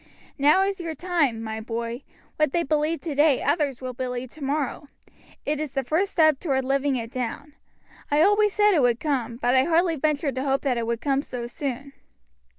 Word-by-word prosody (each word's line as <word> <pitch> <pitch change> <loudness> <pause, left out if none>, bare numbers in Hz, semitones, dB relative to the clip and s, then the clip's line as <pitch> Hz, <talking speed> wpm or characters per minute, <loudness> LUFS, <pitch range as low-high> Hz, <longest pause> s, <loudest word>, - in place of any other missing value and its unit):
Now 300 +7 +5
is 390 -1 -2
your 330 -2 -4
time, 300 -9 0
my 220 0 -4
boy; 235 +2 -4 0.4
what 305 -3 +1
they 340 - +2
believe 305 +2 0
today 295 -3 +2
others 285 -3 0
will 255 -1 -5
believe 250 0 -4
tomorrow; 290 -1 -3 0.6
it 300 0 -1
is 305 -3 -4
the 270 -1 -1
first 370 +8 0
step 315 -4 +4
toward 265 -5 -1
living 275 +1 +1
it 230 -2 -4
down. 260 +3 -5 0.6
I 295 +2 +4
always 415 +2 +4
said 420 -1 +4
it 315 - +3
would 240 -2 +2
come, 260 -6 -1
but 245 0 +1
I 260 0 +4
hardly 335 0 +2
ventured 295 -1 0
to 260 +2 -3
hope 270 -1 +1
that 270 -3 0
it 230 - -3
would 235 0 -2
come 275 -1 +1
so 250 -4 -6
soon." 275 +2 -5
280 Hz, 195 wpm, -25 LUFS, 255-310 Hz, 0.6 s, Now